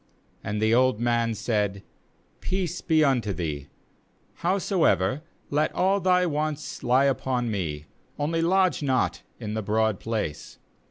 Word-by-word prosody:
20And 105 +1 -2
the 110 +1 +2
old 130 -2 +3
man 120 -1 +1
said 105 -3 -1 0.6
'Peace 180 -2 -2
be 160 -2 +3
unto 125 -8 +1
thee; 75 -5 -4 0.7
howsoever 170 - +1 0.3
let 150 +2 +1
all 195 +2 +2
thy 180 -1 +3
wants 155 -1 -2
he - - -6 0.2
upon 130 -3 0
me; 75 -7 -3 0.3
only 165 +3 0
lodge 185 -1 +2
not 130 -3 0 0.2
in 105 -3 -5
the 110 - -1
broad 110 0 +1
place.' 105 -10 -4
125 Hz, 130 wpm, -26 LUFS, 105-160 Hz, 0.7 s, old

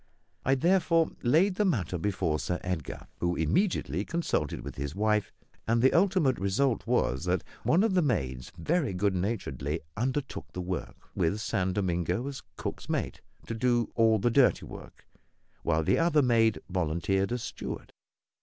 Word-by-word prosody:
I 135 - +3
therefore 165 +1 +3
laid 175 +10 +3
the 210 - +3
matter 100 - 0
before 80 -5 0
Sir 90 - -2
Edgar, 90 -6 -4
who 85 0 0
immediately 90 - 0
consulted 165 - -1
with - - -7
his 70 +3 -4
wife; 105 0 +1 0.4
and 115 +1 +3
the 130 +3 +4
ultimate 180 -7 +3
result 110 +6 +1
was 65 +8 +1
that 90 -1 0 0.2
one 175 +5 +3
of 225 -3 +2
the 185 - +4
maids 65 - -1
very 140 - 0
good 100 +1 +1
naturedly 90 -6 -2 0.2
undertook 130 +5 -3
the 90 - -4
work, 90 -1 -5
with 90 +6 0
San 95 -3 -1
Domingo 90 +2 -1
as 140 0 -6 0.2
cook's - - -5
mate, - - -2 0.2
to - - -4
do 120 0 +1
all 115 -1 +4
the 120 +4 +1
dirty 135 +1 +4
work, - - -11 0.6
while 80 -1 +1
the - - +2
other 165 -3 +3
maid 115 -3 +3
volunteered 90 +3 0
as 120 -2 -2
steward. - - -6
110 Hz, 160 wpm, -29 LUFS, 90-135 Hz, 0.6 s, the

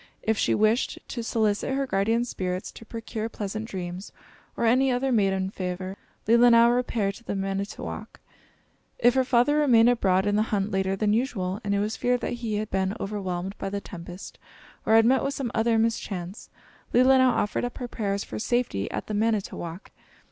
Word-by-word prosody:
If 220 - +1
she - - +1
wished 215 +3 +2
to 240 - -4
solicit 225 +2 0
her 275 0 0
guardian 225 +1 +1
spirits 185 -5 -4
to 225 - -13
procure 225 -1 -5
pleasant 215 +1 -5
dreams, 185 -1 -6 0.5
or - - 0
any 255 +4 +4
other 255 +2 0
maiden 195 -4 +1
favor, 185 0 -4 0.3
Leelinau 235 +1 +6
repaired 230 -5 0
to 235 - -18
the 205 - -4
Manitowok. 195 +1 -4 0.8
If 245 +1 +4
her 260 0 +3
father 255 +3 +3
remained 245 -6 +5
abroad 190 -5 +2
in 205 0 +1
the - - +3
hunt 205 0 0
later 190 0 0
than 210 +1 +1
usual, 210 -5 -1
and 200 -1 0
it - - +1
was 210 +2 -2
feared 245 0 +1
that - - -2
he 220 -3 -2
had 215 0 -3
been 190 +1 0
overwhelmed 195 -2 -4
by 195 - -3
the 200 +1 -3
tempest 180 -1 -10 0.5
or 220 - +5
had 225 0 +6
met 260 +2 +4
with 275 +1 -2
some 255 -4 -3
other 225 0 +2
mischance, 210 -4 -2 0.5
Leelinau 260 +1 +6
offered 210 -3 0
up 245 - -4
her 250 - -4
prayers 200 -3 -2
for - - -6
safety 230 - -1
at - - -4
the 215 - -5
Manitowok. 205 -5 -2
215 Hz, 185 wpm, -26 LUFS, 195-240 Hz, 0.8 s, Leelinau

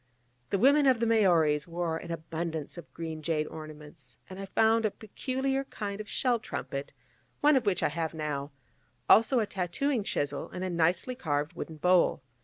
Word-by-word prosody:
The 200 - +1
women 280 +6 +5
of 255 -3 +4
the 230 - +1
Maoris 170 -10 +3
wore 170 -1 -2
an 170 - -9
abundance 160 -1 -4
of 170 -3 -11
green 160 -1 -6
jade 155 0 0
ornaments, 150 -6 -11
and 190 0 -9
I 195 - -4
found 225 +3 +3
a 215 - +2
peculiar 265 +6 -2
kind 205 -4 -5
of 215 - -10
shell 245 -3 +1
trumpet, 140 -9 -5 0.5
one 295 0 +5
of 250 -5 +1
which 195 - +1
I - - +3
have 160 +1 -3
now, 145 -2 -3 0.6
also 235 +3 +6
a 220 - +1
tattooing 205 +7 -1
chisel, 145 -7 -2
and 180 - -6
a 185 - -2
nicely 175 +8 +1
carved 150 - -2
wooden 165 -1 -6
bowl. 180 -3 +3
175 Hz, 180 wpm, -29 LUFS, 155-225 Hz, 0.6 s, also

